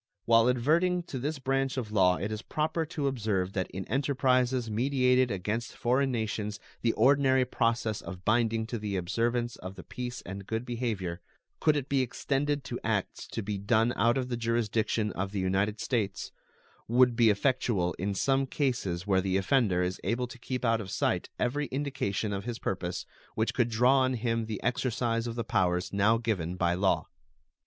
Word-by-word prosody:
While 115 Hz, +1 st, +5 dB
adverting 165 Hz, +9 st, +2 dB
to 135 Hz, -6 st, -6 dB
this 150 Hz, +4 st, -2 dB
branch 135 Hz, 0 st, -1 dB
of 115 Hz, -5 st, -3 dB
law 95 Hz, -4 st, +4 dB
it 100 Hz, +3 st, -3 dB
is 110 Hz, 0 st, -4 dB
proper 155 Hz, +3 st, -1 dB
to 150 Hz, -2 st, -3 dB
observe 105 Hz, -8 st, -1 dB
that 95 Hz, -1 st, -2 dB
in 95 Hz, 0 st, -6 dB
enterprises 130 Hz, -1 st, +1 dB
meditated 125 Hz, +2 st, +2 dB
against 105 Hz, +4 st, -3 dB
foreign 130 Hz, +3 st, +2 dB
nations 110 Hz, -2 st, -2 dB, 0.2 s
the 115 Hz, -, +2 dB
ordinary 130 Hz, +1 st, +4 dB
process 115 Hz, -3 st, 0 dB
of 90 Hz, -1 st, -9 dB
binding 115 Hz, 0 st, +2 dB
to 115 Hz, 0 st, -4 dB
the 105 Hz, -2 st, -3 dB
observance 115 Hz, +6 st, -1 dB
of 95 Hz, +1 st, -8 dB
the -, -, -9 dB
peace 125 Hz, 0 st, -6 dB
and 100 Hz, +1 st, -7 dB
good 110 Hz, +2 st, -2 dB
behavior, 110 Hz, -8 st, -3 dB, 0.4 s
could 155 Hz, -1 st, +3 dB
it 140 Hz, -2 st, -2 dB
be 140 Hz, -2 st, +2 dB
extended 140 Hz, +3 st, -1 dB
to 125 Hz, -3 st, -5 dB
acts 105 Hz, -4 st, -2 dB
to 115 Hz, -, -4 dB
be 100 Hz, 0 st, -3 dB
done 110 Hz, +4 st, +2 dB
out 115 Hz, +4 st, +3 dB
of 130 Hz, -1 st, -1 dB
the 120 Hz, -, -2 dB
jurisdiction 115 Hz, -2 st, 0 dB
of 95 Hz, +2 st, -4 dB
the 100 Hz, -, -1 dB
United 100 Hz, +3 st, 0 dB
States, 105 Hz, -6 st, -2 dB, 0.6 s
would 125 Hz, +1 st, +4 dB
be 115 Hz, -1 st, +5 dB
effectual 105 Hz, -, +1 dB
in 100 Hz, +2 st, -1 dB
some 135 Hz, +5 st, +2 dB
cases 120 Hz, -, -1 dB
where 95 Hz, -2 st, +3 dB
the 95 Hz, 0 st, 0 dB
offender 95 Hz, -3 st, +2 dB
is 90 Hz, +1 st, -3 dB
able 125 Hz, +2 st, 0 dB
to 125 Hz, 0 st, -11 dB
keep 125 Hz, +1 st, -3 dB
out 115 Hz, -1 st, +2 dB
of 95 Hz, -, -7 dB
sight 95 Hz, -, 0 dB
every 145 Hz, +4 st, 0 dB
indication 130 Hz, -7 st, -2 dB
of 100 Hz, +1 st, -4 dB
his 120 Hz, -1 st, -3 dB
purpose 90 Hz, -4 st, -3 dB, 0.3 s
which 110 Hz, +1 st, 0 dB
could 120 Hz, -2 st, +1 dB
draw 125 Hz, +4 st, +4 dB
on 130 Hz, 0 st, +2 dB
him 115 Hz, -1 st, -1 dB
the 110 Hz, -3 st, -5 dB
exercise 120 Hz, -1 st, 0 dB
of 115 Hz, -, -4 dB
the 120 Hz, -, -2 dB
powers 90 Hz, -5 st, 0 dB
now 105 Hz, +3 st, +4 dB
given 100 Hz, -7 st, -2 dB
by 85 Hz, -1 st, +1 dB
law. 95 Hz, +2 st, +1 dB
115 Hz, 185 wpm, -29 LUFS, 100-130 Hz, 0.6 s, While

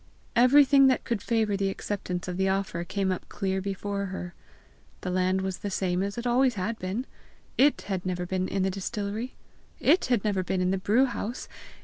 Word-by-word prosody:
Everything 275 Hz, +2 st, +6 dB
that 260 Hz, -, +2 dB
could 230 Hz, -4 st, -2 dB
favour 220 Hz, -3 st, +1 dB
the 195 Hz, 0 st, 0 dB
acceptance 190 Hz, -2 st, -4 dB
of 180 Hz, -, -3 dB
the 190 Hz, +1 st, +1 dB
offer 190 Hz, -3 st, -1 dB
came 190 Hz, +1 st, -1 dB
up 185 Hz, -, -4 dB
clear 190 Hz, -1 st, -1 dB
before 200 Hz, +1 st, -3 dB
her. 180 Hz, -2 st, -6 dB, 0.7 s
The 180 Hz, -, -3 dB
land 185 Hz, +1 st, +1 dB
was 190 Hz, -1 st, -3 dB
the 205 Hz, -, -3 dB
same 185 Hz, -2 st, 0 dB
as 200 Hz, +2 st, -3 dB
it 235 Hz, -, -4 dB
always 250 Hz, 0 st, +3 dB
had 215 Hz, +4 st, -3 dB
been! 195 Hz, +8 st, -3 dB, 0.5 s
it 280 Hz, +2 st, +4 dB
had 190 Hz, -3 st, -3 dB
never 180 Hz, -1 st, -2 dB
been 185 Hz, +1 st, -1 dB
in 195 Hz, -, -1 dB
the 190 Hz, -, +1 dB
distillery! 205 Hz, +5 st, -4 dB, 0.4 s
it 365 Hz, -, +4 dB
had 245 Hz, -5 st, +1 dB
never 205 Hz, -3 st, +1 dB
been 185 Hz, +1 st, -1 dB
in 180 Hz, 0 st, +1 dB
the 195 Hz, -, 0 dB
brew 220 Hz, +8 st, +3 dB
house! 240 Hz, -1 st, -4 dB
195 Hz, 200 wpm, -27 LUFS, 185-230 Hz, 0.7 s, Everything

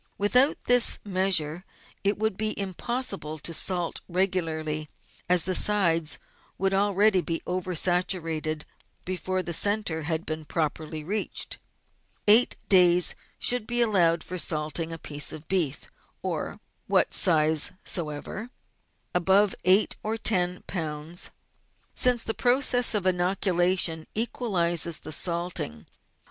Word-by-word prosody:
With 205 Hz, +4 st, -1 dB
out 270 Hz, +4 st, +5 dB
this 245 Hz, -1 st, +5 dB
measure 185 Hz, -4 st, 0 dB, 0.4 s
it 200 Hz, +1 st, +1 dB
would 220 Hz, -1 st, -1 dB
be 215 Hz, +1 st, -1 dB
impossible 195 Hz, -, -3 dB
to 165 Hz, +3 st, -3 dB
salt 175 Hz, 0 st, -1 dB
regularly, 160 Hz, -5 st, -2 dB, 0.4 s
as 180 Hz, -2 st, +4 dB
the 185 Hz, -, -1 dB
sides 170 Hz, -6 st, +2 dB, 0.4 s
would 195 Hz, +1 st, 0 dB
already 200 Hz, 0 st, +2 dB
be 165 Hz, -1 st, -4 dB
over 180 Hz, 0 st, -3 dB
saturated 165 Hz, -3 st, 0 dB, 0.4 s
before 185 Hz, 0 st, -3 dB
the 170 Hz, -, -4 dB
centre 205 Hz, -2 st, 0 dB
had 160 Hz, +1 st, -2 dB
even 155 Hz, -2 st, -5 dB
been 155 Hz, -, -14 dB
properly 155 Hz, 0 st, -3 dB
reached. 205 Hz, +6 st, -3 dB, 0.7 s
Eight 220 Hz, +4 st, +7 dB
days 180 Hz, -2 st, +5 dB, 0.2 s
should 245 Hz, -3 st, +1 dB
be 240 Hz, 0 st, 0 dB
allowed 175 Hz, -8 st, +3 dB
for 180 Hz, 0 st, -4 dB
salting 160 Hz, +1 st, -1 dB
a 165 Hz, -, -5 dB
piece 145 Hz, -2 st, -2 dB
of 155 Hz, 0 st, -10 dB
beef 175 Hz, -7 st, -1 dB, 0.4 s
of -, -, -4 dB, 0.3 s
what -, -, +2 dB
size 155 Hz, -4 st, +3 dB
soever, 170 Hz, +7 st, -4 dB, 0.6 s
above 190 Hz, +3 st, +3 dB
eight 190 Hz, +3 st, +3 dB
or 220 Hz, +1 st, -3 dB
ten 180 Hz, -5 st, 0 dB
lb., 160 Hz, 0 st, -4 dB, 0.6 s
since 250 Hz, -2 st, +5 dB
the 225 Hz, -, -2 dB
process 245 Hz, -1 st, +2 dB
of 200 Hz, -3 st, 0 dB
inoculation 180 Hz, -2 st, +1 dB
equalises 175 Hz, -8 st, 0 dB
the 155 Hz, -, -9 dB
salting. 170 Hz, -, -3 dB
180 Hz, 125 wpm, -26 LUFS, 160-205 Hz, 0.7 s, Eight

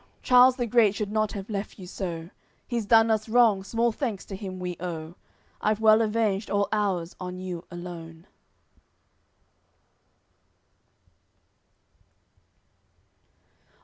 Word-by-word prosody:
Charles 250 Hz, 0 st, +6 dB
the 245 Hz, -2 st, -1 dB
great 220 Hz, -3 st, +3 dB
should 205 Hz, -1 st, -3 dB
not 215 Hz, -1 st, 0 dB
have 195 Hz, -1 st, -6 dB
left 205 Hz, -2 st, -5 dB
you 190 Hz, -, -9 dB
so; 175 Hz, -2 st, -6 dB, 0.4 s
He's 235 Hz, -4 st, -2 dB
done 225 Hz, 0 st, +5 dB
us 220 Hz, 0 st, 0 dB
wrong, 220 Hz, -4 st, +4 dB
small 230 Hz, +4 st, 0 dB
thanks 220 Hz, -4 st, -4 dB
to 195 Hz, -, -7 dB
him 190 Hz, -2 st, -7 dB
we 180 Hz, -1 st, -4 dB
owe; 165 Hz, -2 st, -5 dB, 0.5 s
I've 215 Hz, 0 st, +1 dB
well 220 Hz, 0 st, +6 dB
avenged 215 Hz, -2 st, 0 dB
all 200 Hz, 0 st, +1 dB
ours 190 Hz, -5 st, -1 dB
on 180 Hz, 0 st, -6 dB
you 180 Hz, -2 st, -6 dB
alone." 170 Hz, -1 st, -9 dB
205 Hz, 115 wpm, -26 LUFS, 180-225 Hz, 0.5 s, Charles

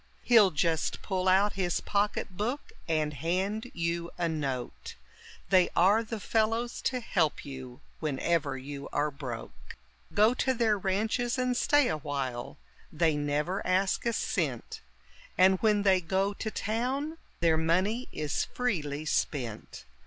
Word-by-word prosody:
He'll 225 Hz, -5 st, +6 dB
just 160 Hz, -1 st, 0 dB
pull 190 Hz, -2 st, -1 dB
out 195 Hz, +2 st, +4 dB
his 180 Hz, -3 st, 0 dB
pocket 205 Hz, -1 st, -1 dB
book 240 Hz, +9 st, -3 dB, 0.2 s
and 155 Hz, -2 st, 0 dB
hand 190 Hz, -, -1 dB
you 170 Hz, 0 st, -1 dB
a 175 Hz, -, 0 dB
note, 140 Hz, -6 st, -4 dB, 0.5 s
They 185 Hz, -2 st, +5 dB
are 200 Hz, +6 st, +5 dB
the 225 Hz, 0 st, -5 dB
fellows 225 Hz, +3 st, 0 dB
to 255 Hz, -, -3 dB
help 175 Hz, -9 st, 0 dB
you 130 Hz, -3 st, -8 dB, 0.2 s
whenever 150 Hz, -1 st, 0 dB
you 140 Hz, +2 st, -7 dB
are 150 Hz, +1 st, 0 dB
broke. 130 Hz, -5 st, -8 dB, 0.4 s
Go 215 Hz, +3 st, +5 dB
to 260 Hz, +1 st, 0 dB
their 225 Hz, -3 st, +3 dB
ranches 215 Hz, +6 st, 0 dB
and 255 Hz, -1 st, +1 dB
stay 290 Hz, +2 st, +4 dB
a 155 Hz, -, 0 dB
while, 135 Hz, -5 st, -4 dB, 0.3 s
they 160 Hz, -1 st, +2 dB
never 150 Hz, +6 st, -1 dB
ask 185 Hz, +1 st, +1 dB
a 235 Hz, -, +1 dB
cent; 145 Hz, -, -2 dB, 0.6 s
And 185 Hz, +1 st, +5 dB
when 210 Hz, -2 st, +3 dB
they 190 Hz, -2 st, +4 dB
go 190 Hz, +4 st, 0 dB
to 220 Hz, -, -4 dB
town, 260 Hz, +10 st, -2 dB, 0.2 s
their 165 Hz, -2 st, +4 dB
money 185 Hz, +10 st, +1 dB
is 150 Hz, -1 st, -1 dB
freely 155 Hz, -, -2 dB
spent. 120 Hz, -, -2 dB
185 Hz, 140 wpm, -29 LUFS, 150-215 Hz, 0.6 s, He'll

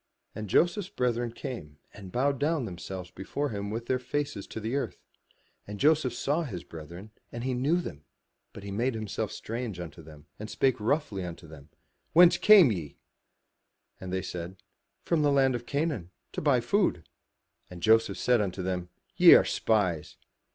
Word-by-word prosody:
And 105 Hz, -2 st, -6 dB
Joseph's 175 Hz, -, +2 dB
brethren 120 Hz, -5 st, -1 dB
came, 95 Hz, -, -7 dB, 0.2 s
and 95 Hz, -2 st, -11 dB
bowed 135 Hz, +3 st, +1 dB
down 150 Hz, -2 st, 0 dB
themselves 90 Hz, -1 st, -7 dB
before 140 Hz, +10 st, -3 dB
him 100 Hz, -1 st, -4 dB
with 115 Hz, +2 st, -4 dB
their 130 Hz, +1 st, 0 dB
faces 125 Hz, -5 st, -3 dB
to -, -, -6 dB
the 110 Hz, +4 st, -3 dB
earth. 120 Hz, -9 st, -2 dB, 0.7 s
And 105 Hz, 0 st, -7 dB
Joseph 145 Hz, -4 st, +3 dB
saw 145 Hz, +7 st, 0 dB
his 105 Hz, -, -5 dB
brethren, 85 Hz, +6 st, -10 dB, 0.2 s
and 120 Hz, 0 st, -6 dB
he 130 Hz, 0 st, -1 dB
knew 140 Hz, +8 st, +1 dB
them, 75 Hz, -, -7 dB, 0.5 s
but 100 Hz, -, -11 dB
made 115 Hz, +5 st, -1 dB
himself 110 Hz, -3 st, -3 dB
strange 115 Hz, -5 st, -5 dB
unto 85 Hz, -1 st, -8 dB
them, 75 Hz, -1 st, -14 dB
and 105 Hz, +1 st, -6 dB
spake 130 Hz, 0 st, +1 dB
roughly 110 Hz, -, -1 dB
unto 85 Hz, -1 st, -7 dB
them, 75 Hz, -2 st, -13 dB, 0.4 s
"Whence 175 Hz, +2 st, +7 dB
come 200 Hz, -, +8 dB
ye?'* 80 Hz, -8 st, -5 dB, 1.0 s
And 95 Hz, -1 st, -7 dB
they 95 Hz, 0 st, -1 dB
said, 90 Hz, 0 st, -6 dB, 0.5 s
"From 170 Hz, -3 st, +1 dB
the 145 Hz, -1 st, +3 dB
land 135 Hz, -2 st, +3 dB
of 120 Hz, 0 st, -5 dB
Canaan 140 Hz, -, -2 dB, 0.2 s
to -, -, -4 dB
buy 140 Hz, -5 st, +3 dB
food." 120 Hz, -, 0 dB, 0.6 s
And 85 Hz, -2 st, -10 dB
Joseph 110 Hz, -2 st, +4 dB
said 125 Hz, -3 st, +3 dB
unto 95 Hz, -2 st, -3 dB
them, 90 Hz, -1 st, -3 dB, 0.3 s
"Ye -, -, +9 dB
are -, -, +5 dB
spies. 90 Hz, -9 st, 0 dB
110 Hz, 170 wpm, -28 LUFS, 90-135 Hz, 1.0 s, Ye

